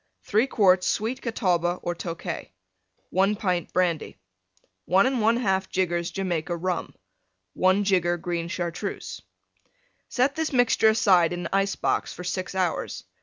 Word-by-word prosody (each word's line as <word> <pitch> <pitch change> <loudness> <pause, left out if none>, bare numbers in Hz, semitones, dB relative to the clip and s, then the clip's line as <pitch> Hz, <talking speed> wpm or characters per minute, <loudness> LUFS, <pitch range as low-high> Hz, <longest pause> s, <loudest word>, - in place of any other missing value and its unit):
3 220 +6 +2
quarts 185 -7 +3
Sweet 240 +5 -1
Catawba 180 -7 0
or 175 - -1
Tokay. 170 0 -5 0.6
1 195 +3 +2
pint 185 -5 -1
Brandy. 175 - 0 0.7
1 190 +3 +4
1/2 225 -6 +1
jiggers 175 -2 0
Jamaica 175 -3 -2
Rum. 180 0 -3 0.6
1 185 +2 +3
jigger 180 -3 +2
Green 170 -1 -3
Chartreuse. 175 +3 -4 0.9
Set 260 +2 +1
this 320 -1 -1
mixture 245 -4 +4
aside 185 -6 +4
in 175 -1 -4
ice 195 0 +1
box - - -1
for 180 - -8
6 185 +1 -4
hours. 185 -3 -2
185 Hz, 125 wpm, -25 LUFS, 175-210 Hz, 0.9 s, 1